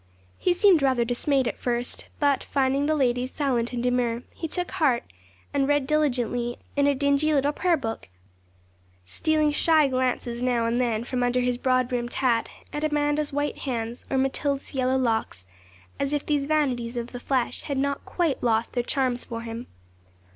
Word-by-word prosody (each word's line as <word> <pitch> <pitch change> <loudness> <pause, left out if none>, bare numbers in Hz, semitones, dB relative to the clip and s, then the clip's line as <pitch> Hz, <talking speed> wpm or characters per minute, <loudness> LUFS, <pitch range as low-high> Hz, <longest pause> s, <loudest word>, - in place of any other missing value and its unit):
He 360 - +2
seemed 360 -4 +5
rather 260 -3 +2
dismayed 260 +2 +1
at - - -4
first; 245 0 -2
but, 285 -2 +2
finding 275 +1 +1
the 310 - +2
ladies 250 -2 +1
silent 250 -5 0
and 245 -1 -3
demure, 245 -1 0
he 325 - -4
took 355 +3 -3
heart, 300 -10 +2 0.5
and 275 -1 +2
read 290 -1 +2
diligently 245 -5 0 0.2
in 285 0 +3
a 285 - +3
dingy 280 +2 +2
little 285 -1 +2
prayer 345 +2 +1
book, 225 - -5 1.0
stealing 305 - +1
shy 310 0 +4
glances 250 -2 -1
now 245 -2 +1
and 235 +2 +1
then 230 -2 0
from 250 +1 -2
under 245 +1 +2
his 245 0 0
broad 255 -1 +2
brimmed 240 -1 -3
hat 240 -4 +1 0.2
at 295 - -3
Amanda's 295 0 +1
white 290 +1 -2
hands, 235 -3 -4
or 270 - 0
Matilda's 275 +2 -1
yellow 260 -1 +1
locks, 225 - -1 0.5
as 280 +1 0
if 290 - -1
these 290 -2 0
vanities 255 -6 0
of 235 0 -4
the 245 - -6
flesh 255 -1 0
had 280 - -3
not 280 +1 -1
quite 335 -6 -1
lost 225 -1 +1
their 245 - +1
charms 250 0 -1
for 230 -1 -6
him. 230 +1 -6
260 Hz, 175 wpm, -25 LUFS, 240-290 Hz, 1.0 s, seemed